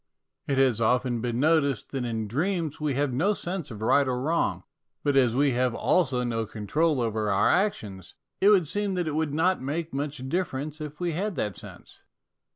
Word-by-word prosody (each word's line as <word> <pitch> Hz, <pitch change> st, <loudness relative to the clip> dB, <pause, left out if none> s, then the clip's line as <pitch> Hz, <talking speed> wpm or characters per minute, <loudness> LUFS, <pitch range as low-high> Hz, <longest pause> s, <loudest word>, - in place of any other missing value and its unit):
It 140 Hz, -, 0 dB
has 130 Hz, -4 st, +3 dB
often 125 Hz, +1 st, +1 dB
been 120 Hz, 0 st, -2 dB
noticed 140 Hz, -5 st, +2 dB
that 135 Hz, -3 st, -2 dB
in 110 Hz, -2 st, -3 dB
dreams 160 Hz, -, -2 dB
we 150 Hz, -3 st, 0 dB
have 140 Hz, -1 st, 0 dB
no 180 Hz, +12 st, +2 dB
sense 175 Hz, -5 st, -4 dB
of 110 Hz, -2 st, -7 dB
right 140 Hz, +4 st, +3 dB
or 125 Hz, -1 st, -1 dB
wrong; 160 Hz, +6 st, 0 dB, 0.4 s
but 145 Hz, -1 st, +1 dB
as 125 Hz, -4 st, +4 dB
we 140 Hz, +1 st, +3 dB
have 125 Hz, -1 st, 0 dB
also 135 Hz, -8 st, +1 dB
no 115 Hz, -2 st, -2 dB
control 145 Hz, +9 st, 0 dB
over 110 Hz, -3 st, -1 dB
our 100 Hz, 0 st, +3 dB
actions, 105 Hz, -, -1 dB, 0.2 s
it 200 Hz, -, +5 dB
would 190 Hz, -6 st, +4 dB
seem 205 Hz, +3 st, -2 dB
that 175 Hz, -2 st, -1 dB
it 155 Hz, -, -2 dB
would 155 Hz, -1 st, -1 dB
not 180 Hz, +4 st, +2 dB
make 155 Hz, +5 st, -3 dB
much 140 Hz, -1 st, -4 dB
difference 155 Hz, -2 st, -3 dB
if 150 Hz, 0 st, -7 dB
we 175 Hz, -1 st, -1 dB
had 190 Hz, +4 st, -2 dB
that 105 Hz, -3 st, -2 dB
sense. -, -, -12 dB
140 Hz, 195 wpm, -26 LUFS, 120-165 Hz, 0.4 s, it